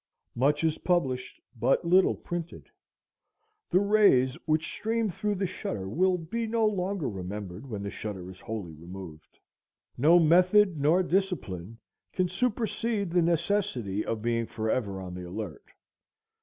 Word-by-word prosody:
Much 145 +5 +2
is 160 -1 +1
published, 130 -8 -1 0.2
but 120 +8 +1
little 185 +2 +4
printed. 175 -1 -6 1.0
The 185 - +4
rays 200 -11 +4
which 155 0 +2
stream 225 -1 -1
through 210 +4 -2
the 195 0 -1
shutter 110 - -4
will 180 - +2
be 225 +8 -3
no 225 0 +1
longer 195 -4 -1
remembered 95 +3 -6
when 105 -3 -4
the 100 - -4
shutter 95 -4 -6
is 95 - -14
wholly 105 -7 -6
removed. 85 0 -11 0.6
No 160 +6 +6
method 180 +2 +5
nor 165 +6 +4
discipline 160 - -2 0.4
can 185 -1 +1
supersede 225 -1 -1
the 175 0 +3
necessity 165 - 0
of 110 -1 -3
being 115 -1 0
forever 110 -3 -2
on 90 -1 -7
the 90 0 -7
alert. 100 -4 -6
155 Hz, 140 wpm, -28 LUFS, -, 1.0 s, No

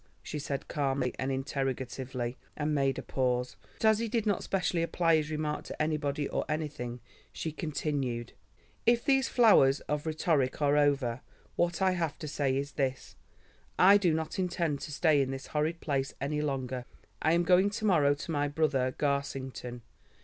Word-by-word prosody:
she 150 - -5
said 140 -1 -4
calmly 135 -3 -1
and 130 +1 -1
interrogatively, 130 -2 -3 0.2
and 150 0 0
made 135 -2 +1
a - - -4
pause, 125 -2 -1 0.2
but - - -2
as 220 -1 +5
he 230 - -1
did 225 0 0
not 205 -2 +1
specially 180 -3 0
apply 165 0 +2
his 155 -1 0
remark 155 -1 -2
to - - -8
anybody 150 -2 0
or - - -1
anything, 150 -6 -3 0.3
she 160 - -4
continued: 140 -6 -3 0.5
"If 235 +1 +4
these 270 -2 +3
flowers 175 - +5
of 150 +1 -3
rhetoric 155 -4 +1
are 145 -1 +3
over, 140 -4 +2 0.3
what 175 +2 +1
I 190 - +4
have 170 -4 -2
to 155 - -6
say 140 -2 0
is 140 +1 -3
this: 135 -1 -3 0.6
I 195 +2 +8
do 185 -4 +2
not 160 +3 -2
intend 170 -5 0
to - - -6
stay 150 -1 +3
in 135 - 0
this 135 0 -5
horrid 155 +2 0
place 135 -2 -1
any 150 +2 -1
longer. 130 -4 -3 0.4
I 160 - +3
am 170 +1 +3
going 185 +3 +4
to 215 +1 -4
morrow 150 -8 +4
to 150 - -6
my 145 -2 +1
brother 140 -4 0
Garsington. 135 -3 -2
145 Hz, 175 wpm, -30 LUFS, 135-165 Hz, 0.6 s, I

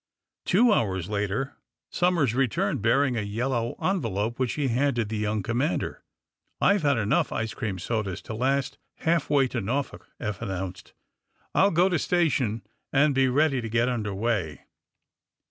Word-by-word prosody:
Two 220 +5 +4
hours 95 - 0
later 105 +6 -2 0.3
Somers 175 -9 +2
returned, 130 0 0
bearing 130 +4 +3
a 115 - 0
yellow 115 +3 -1
envelope, 115 - -1
which 130 -2 0
he 145 -2 -1
handed 120 -3 +1
the 110 - -2
young 105 -1 -1
commander. 125 - -1 0.6
"I've 200 0 +4
had 140 -4 +2
enough 105 -1 +1
ice 110 0 -2
cream 105 -6 -3
sodas 100 0 -2
to - - -6
last 130 +4 0 0.3
half 165 -2 +2
way 140 -2 +4
to 120 - -2
Norfolk," 130 +8 -3
Eph 105 -2 -4
announced. 95 -3 -5 0.6
"I'll 195 - +5
go 175 +1 +3
to 175 -4 +1
station 135 -12 +1 0.3
and 145 +1 +4
be 135 0 +3
ready 135 0 +2
to 115 - -5
get 115 +2 +2
under 110 -4 -2
way." 100 - -1
120 Hz, 155 wpm, -26 LUFS, 105-140 Hz, 0.6 s, I'll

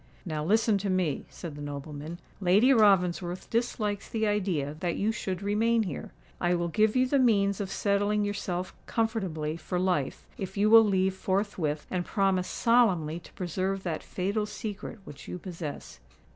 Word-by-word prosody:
"Now 155 -3 -3
listen 215 +3 +3
to 200 +1 -2
me," 185 -6 0
said 165 -4 -8
the 145 - -9
nobleman. 145 +3 -6 0.2
"Lady 205 +8 +5
Ravensworth 180 -5 +2
dislikes 215 -3 -1
the 220 -1 0
idea 185 -9 0
that 175 -1 -1
you 210 +2 +1
should 190 -4 -4
remain 225 +3 +2
here. 175 -9 -6 0.3
I 175 0 +2
will 170 0 -1
give 215 +5 +2
you 255 0 +4
the 275 +2 +2
means 200 -5 +3
of 195 - -3
settling 205 +1 +1
yourself 185 -3 -3
comfortably 190 -9 -1
for 175 +2 -3
life, 180 -7 0
if 190 0 -5
you 210 +2 +3
will 225 0 +10
leave 190 -2 +2
forthwith, 190 -6 -1
and 180 -1 0
promise 190 -2 +1
solemnly 185 -10 +2
to 175 - -16
preserve 190 +2 -2
that 170 -3 -2
fatal 200 +3 -2
secret 210 +1 -6
which 145 - -11
you - - -5
possess." 170 -5 -7
190 Hz, 165 wpm, -28 LUFS, 175-210 Hz, 0.3 s, will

